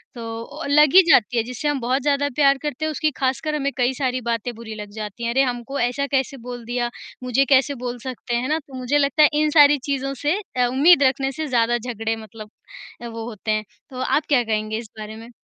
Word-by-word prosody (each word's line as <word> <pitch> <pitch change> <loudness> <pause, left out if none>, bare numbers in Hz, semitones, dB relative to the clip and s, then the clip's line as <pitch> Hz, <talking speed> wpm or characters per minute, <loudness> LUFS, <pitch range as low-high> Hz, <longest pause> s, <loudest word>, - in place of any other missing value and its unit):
तो 230 +6 -7
लग 300 +1 +5
ही 380 - +11
जाती 245 -4 +4
है, 230 - +2
जिससे 250 +5 -5
हम 290 -2 0
बहुत 255 +3 0
ज़्यादा 285 0 +1
प्यार 275 -2 +4
करते 300 0 -3
हैं, 315 - -1
उसकी 310 +1 0
ख़ासकर 270 +4 -1
हमें 280 -1 -1
कई 250 +1 +2
सारी 255 -1 -2
बातें 235 0 -2
बुरी 220 -1 -8
लग 210 -1 -8
जाती 215 +1 -6
हैं। 235 - 0
अरे! 265 - +3
हमको 250 +2 -3
ऐसा 250 +4 0
कैसे 270 -1 -1
बोल 245 -1 -6
दिया? 240 0 -2 0.3
मुझे 255 +2 +2
कैसे 275 +1 +3
बोल 245 0 -3
सकते 255 -2 -4
हैं 240 +2 -1
ना? 310 +1 +1
तो 285 -3 -18
मुझे 255 +3 0
लगता 285 +1 +3
है 300 - +7
इन 305 - +2
सारी 290 0 +7
चीज़ों 275 0 -1
से 300 +7 +1 0.2
अ, 250 -1 +2
उम्मीद 285 +5 +5
रखने 270 0 +1
से 310 +3 -4
ज़्यादा 240 -2 +2
झगड़े 225 -2 -3
मतलब 215 -1 -11 0.5
अ, 240 - -6
वो 230 -1 -6
होते 215 -1 -4
हैं। 215 0 0 0.3
तो 255 - -8
आप 300 +3 +1
क्या 265 -4 +4
कहेंगे 215 -1 -2
इस 225 -1 -8
बारे 215 0 -7
में? 225 +1 -11
255 Hz, 235 wpm, -22 LUFS, 230-280 Hz, 0.5 s, ही